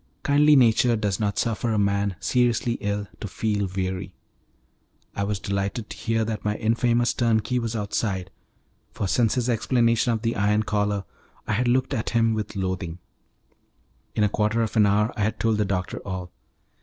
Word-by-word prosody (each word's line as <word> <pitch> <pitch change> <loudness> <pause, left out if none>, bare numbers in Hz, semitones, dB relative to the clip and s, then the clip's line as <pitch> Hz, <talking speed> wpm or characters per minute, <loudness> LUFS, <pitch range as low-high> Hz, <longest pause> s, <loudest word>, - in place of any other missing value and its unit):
Kindly 145 +1 +5
nature 120 -1 +4
does 105 -3 -1
not 105 -2 -1
suffer 115 0 0
a 110 - +1
man 100 -1 +1
seriously 120 -1 +1
ill 100 0 -2
to - - -5
feel 105 -2 -1
weary. 95 0 -3 1.0
I 100 - -1
was 100 0 -1
delighted 100 +4 -3
to - - -6
hear 115 -1 0
that 110 -1 -4
my 105 0 0
infamous 120 +2 +1
turnkey 120 +1 +1
was 115 -1 -3
outside, 100 -3 -2 0.6
for 100 - -3
since 115 +3 +2
his 125 -2 0
explanation 115 0 +2
of 110 -1 -2
the 115 0 0
iron 105 +1 +2
collar 105 -2 0 0.4
I 110 - -1
had 120 +4 +1
looked 130 +2 +1
an 110 - -1
him 115 -1 +2
with 105 -1 -4
loathing. 95 -3 -3 1.2
In 105 - +2
a 105 - +3
quarter 105 +3 +1
of 110 - -4
an 105 -2 +5
hour 105 +2 +2
I - - -3
had 110 +1 0
told 110 -2 +1
the 105 - +2
doctor 95 -2 -2
all. 95 -2 -6
105 Hz, 180 wpm, -24 LUFS, 100-115 Hz, 1.2 s, Kindly